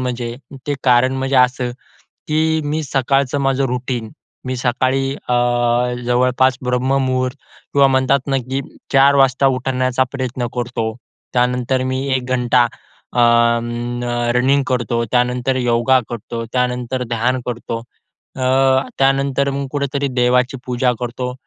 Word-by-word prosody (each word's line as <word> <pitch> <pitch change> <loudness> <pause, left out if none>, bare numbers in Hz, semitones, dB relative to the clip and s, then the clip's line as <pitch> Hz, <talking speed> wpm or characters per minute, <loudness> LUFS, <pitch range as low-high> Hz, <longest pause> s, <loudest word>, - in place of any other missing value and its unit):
म्हणजे 120 -2 -3 0.3
ते 145 - 0
कारण 125 0 +4
म्हणजे 135 0 0
असं, 125 0 +2 0.6
की 160 +1 +1
मी 150 +2 -1
सकाळचं 135 0 0
माझं 135 0 +1
रुटीन 125 -2 -3 0.3
मी 130 0 -2
सकाळी 130 +2 0 0.2
अ, - - +2 0.7
जवळपास 125 +1 +2
ब्रह्ममुहूर्त 130 +1 0 0.4
किंवा 140 -1 +5
म्हणतात 130 +1 +2
ना, 135 -1 +1
की 130 +2 -3 0.3
4:00 140 +1 +6
वाजता 135 0 +3
उठवण्याचा 130 0 0
प्रयत्न 130 -2 -3
करतो. 120 -2 -2 0.4
त्यानंतर 125 +1 +1
मी 130 0 -1 0.2
एक 130 - -1
घंटा 125 0 +3 0.5
अ, 120 - 0
अं, 120 0 +2 0.3
रनिंग 135 +3 +3
करतो, 120 -2 0
त्यानंतर 125 +1 +1
योगा 125 +1 +3
करतो, 115 0 -5
त्यानंतर 125 0 -1
ध्यान 120 +2 0
करतो, 120 -1 -4 0.6
अ, 130 - -3 0.6
त्यानंतर 135 0 +2
मग 140 0 -3
कुठेतरी 140 -1 -1
देवाची 125 0 +1
पूजा 125 0 +1
करतो. 125 +1 -4
130 Hz, 125 wpm, -18 LUFS, 125-135 Hz, 0.7 s, 4:00